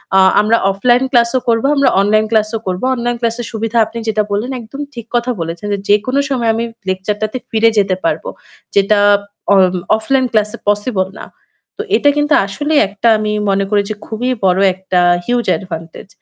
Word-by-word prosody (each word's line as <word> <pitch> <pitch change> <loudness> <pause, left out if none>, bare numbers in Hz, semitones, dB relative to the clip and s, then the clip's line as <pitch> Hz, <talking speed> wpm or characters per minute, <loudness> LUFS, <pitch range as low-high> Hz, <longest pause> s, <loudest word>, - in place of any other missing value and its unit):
আ - - +6 0.2
আমরা 220 +2 +2
offline 245 +5 +2
class 235 -3 +3
ও - - +1
করব, 230 -1 +2
আমরা 275 -1 +3
অনলাইন 215 +2 +2
ক্লাসও 220 0 +1
করব। 185 0 -2
অনলাইন 240 0 -2
ক্লাস 230 -1 0
এর 235 - -6
সুবিধা 225 +1 -3
আপনি 220 +2 -9
যেটা 215 -1 +1
বললেন 215 +6 -2
একদম 235 +5 -9
ঠিক 235 -3 -8
কথা 240 +1 0
বলেছেন। 165 +4 -5
যে 200 - -2
যেকোনো 215 +7 +2
সময় 245 -4 0
আমি 230 - -1 0.3
লেকচার 190 +2 -2
টাতে 215 +4 -2
ফিরে 225 0 +4
যেতে 195 -2 +2
পারব। - - -1 0.5
যেটা 200 +1 +3 0.5
অ - - +5 0.4
অফলাইন 260 +4 0
ক্লাস 215 -2 +1
এ - - -28
পসিবল 205 -2 0
না। - - -8 0.5
তো - - -3
এটা 290 - +3
কিন্তু 295 0 +1
আসলেই 290 +10 0
একটা 200 +4 -2
আমি 215 0 -2 0.2
মনে 195 0 +1
করি 205 -1 +2
যে 215 - -3
খুবই 235 +3 -3 0.2
বড় 185 0 +3 0.2
একটা 190 -1 -1 0.3
হিউজ 245 +2 0
অ্যাডভান্টেজ। 165 -2 -5
220 Hz, 190 wpm, -15 LUFS, 200-240 Hz, 0.5 s, আ